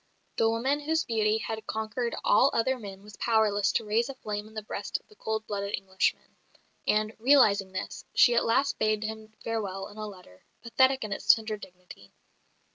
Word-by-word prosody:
The 225 - +3
woman 260 +6 0
whose 315 +2 0
beauty 220 -1 +1
had 220 -1 -5
conquered 220 +2 -2
all 270 - +5
other 255 +3 +1
men 195 -3 -9
was 210 0 -13
powerless 210 -3 +2
to 225 - 0
raise 225 +4 +1
a 275 - -6
flame 210 -4 -5
in 220 - -17
the 215 - -4
breast - - -4
of - - -34
the 425 - -20
cold 220 - -3
blooded 200 0 -2
Englishman; 190 -1 -2 0.5
and, 215 +1 +1
realising 215 -7 +4
this, 185 - -5
she 240 - +6
at 235 - +3
last 270 +5 +1
bade 215 0 +1
him 220 0 -7
farewell 200 -4 -3
in 205 - -14
a 215 0 -4
letter, 180 - -14 0.2
pathetic 260 +2 +3
in 210 -2 -3
its - - +5
tender 220 -1 0
dignity. 180 - -14
220 Hz, 190 wpm, -28 LUFS, 205-230 Hz, 0.5 s, she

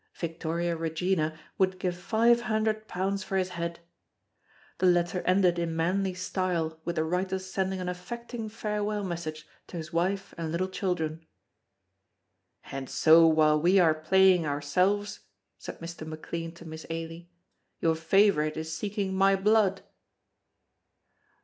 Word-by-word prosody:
Victoria 170 +1 -2
Regina 160 0 -1 0.2
would 185 -1 +2
give 180 -1 -2
five 230 +6 +3
hundred 220 -1 -1
pounds 190 +1 -2
for 195 - -2
his 185 -1 0
head. 170 -1 -5 1.0
The 185 - +3
letter 175 0 +2
ended 185 -2 +3
in 165 -1 -2
manly 185 +3 0
style 180 -3 -2
with 170 - -3
the 160 - +1
writer's 185 +3 -2
sending 190 0 -2
an 180 - -4
affecting 225 +5 -6
farewell 210 -1 -2
message 165 -4 -5 0.2
to 175 - -7
his 165 +1 -7
wife 190 +3 -1
and 160 -1 -3
little 185 +3 -1
children. 165 -4 -3 1.4
"And 135 -1 -5
so 165 +1 +6
while 155 -1 +4
we 180 +4 +4
are 170 -4 +5
playing 185 +3 +4
ourselves," 180 +8 0 0.4
said - - -8
Mr. 165 -1 -7
McLean 165 +1 -5
to 170 - -13
Miss 160 0 -8
Ailie, 165 +1 -6 0.5
"your 165 - +2
favorite 160 -2 +2
is 160 0 -4
seeking 200 -2 -2
my 195 +1 +4
blood." 195 -1 +2
180 Hz, 135 wpm, -28 LUFS, 165-195 Hz, 1.4 s, so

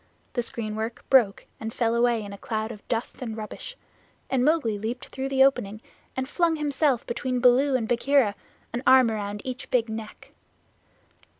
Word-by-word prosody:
The 240 - 0
screen 220 -2 -4
work 220 +2 -4
broke 235 -7 +4
and 220 0 -4
fell 230 -1 0
away 235 -1 +2
in 200 0 -8
a - - -8
cloud 220 0 -3
of 210 -3 -10
dust 230 +2 -3
and 225 -3 -4
rubbish, 220 - -7 0.5
and 260 -2 +2
Mowgli 260 -9 +2
leaped 240 +5 -4
through 265 0 -4
the 265 -1 +5
opening 235 -6 +1 0.4
and 260 0 -1
flung 335 +2 +1
himself 290 -4 +1
between 250 +1 -2
Baloo 260 +3 +4
and 230 -4 0
Bagheera 245 -2 +3 0.4
an 240 - -2
arm 260 -3 +7
around 205 -1 -4
each 255 -1 -5
big 235 -2 +1
neck. 220 -1 -8
240 Hz, 175 wpm, -26 LUFS, 220-265 Hz, 0.5 s, arm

